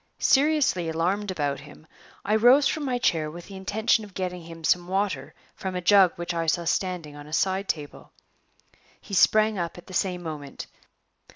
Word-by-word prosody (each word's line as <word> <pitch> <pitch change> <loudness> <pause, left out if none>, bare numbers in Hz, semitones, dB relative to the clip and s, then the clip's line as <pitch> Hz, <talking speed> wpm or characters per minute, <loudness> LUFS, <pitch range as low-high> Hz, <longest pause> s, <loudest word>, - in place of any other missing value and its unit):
Seriously 275 - +2
alarmed 185 +6 -1
about 145 -6 -2
him, 145 +2 -14 0.4
I 210 - +2
rose 245 +6 +6
from 305 -2 -2
my 255 -2 0
chair 160 -10 +1
with 170 +2 -10
the 195 - -11
intention 215 +4 +1
of 205 -3 -13
getting 180 -1 -3
him 165 0 -11
some 175 +2 +2
water 185 -7 -2 0.2
from 190 -1 -5
a - - -1
jug 190 0 +5
which 175 0 -4
I 165 -1 -2
saw 170 +2 +1
standing 175 -4 -2
on 145 0 -11
a 155 - -11
side 190 +3 0
table. 150 -3 -5 0.9
He 200 - -13
sprang 215 +1 +4
up 170 0 -4
at 175 - -12
the 185 - -12
same 180 -1 -1
moment. 150 -4 -7
180 Hz, 185 wpm, -25 LUFS, 165-205 Hz, 0.9 s, rose